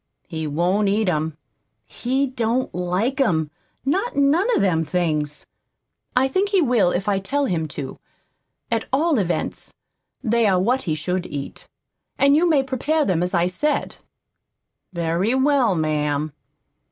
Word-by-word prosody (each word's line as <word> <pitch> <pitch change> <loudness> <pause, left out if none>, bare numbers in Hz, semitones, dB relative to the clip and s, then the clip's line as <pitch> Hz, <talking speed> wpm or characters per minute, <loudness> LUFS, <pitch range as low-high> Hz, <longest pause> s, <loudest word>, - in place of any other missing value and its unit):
"He 160 -2 -4
won't 180 +7 +1
eat 210 +1 +1
'em. 155 -2 -1 0.5
He 265 - -1
don't 250 -1 -1
like 185 +10 0
'em 160 - +1 0.3
not 390 - 0
none 285 +8 +3
of - - +2
them 170 -5 +2
things." 150 -2 -2 0.7
"I 255 +1 +4
think 380 +9 0
he 395 -2 +3
will 240 - +3
if 185 +3 -2
I 200 -2 +2
tell 280 +9 -1
him 165 -9 -1
to. 140 -2 -7 0.7
At 230 -1 0
all 300 0 +2
events, 175 -3 -2 0.5
they 230 0 +2
are 185 -2 +3
what 245 +8 +1
he 155 - +1
should 180 +4 -2
eat, 140 -1 -7 0.5
and 280 +1 +5
you 340 +3 +3
may 290 -4 +4
prepare 285 +4 0
them 175 -3 +1
as 180 +1 -1
I 170 0 +3
said." 280 +12 -1 0.9
"Very 170 +6 0
well, 265 -6 +3
ma'am." 150 -1 -1
200 Hz, 150 wpm, -22 LUFS, 165-270 Hz, 0.9 s, and